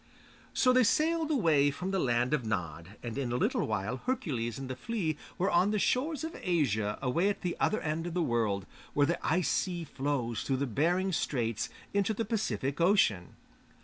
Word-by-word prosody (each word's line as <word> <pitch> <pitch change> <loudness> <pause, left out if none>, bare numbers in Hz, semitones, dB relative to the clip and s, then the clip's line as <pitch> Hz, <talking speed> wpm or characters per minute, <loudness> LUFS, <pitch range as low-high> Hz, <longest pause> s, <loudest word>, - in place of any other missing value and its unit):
So 255 -1 +4
they 255 0 +5
sailed 315 +7 +2
away 160 - +3
from 180 +7 -4
the 195 - +1
'Land 120 -1 +1
of 145 -5 +1
Nod,' 90 -3 -4
and 120 +2 -4
in 125 -3 -2
a - - 0
little 125 - +1
while 110 +3 -2
Hercules 125 - -2
and 135 -1 -6
The 130 - -4
Flea 190 - -2 0.2
were 190 - +1
on 180 +3 +4
the 210 - +1
shores 280 +9 0
of 325 +1 -5
Asia 110 - +1
away 165 +10 +2
at 205 - -3
the 180 -2 -2
other 215 - +2
end 160 +2 -2
of 175 - -5
the 175 - +2
world, 110 - 0 0.3
where 145 - +5
the 170 +4 -1
Ice 170 -2 +1
Sea 175 -3 -1
flows 135 -6 -2
through 135 +1 0
Behring 175 - +1
Straits 115 - -1 0.2
into 200 +2 +1
the 225 - -1
Pacific 195 - -1
Ocean. 165 - +3
150 Hz, 190 wpm, -31 LUFS, 120-195 Hz, 0.3 s, they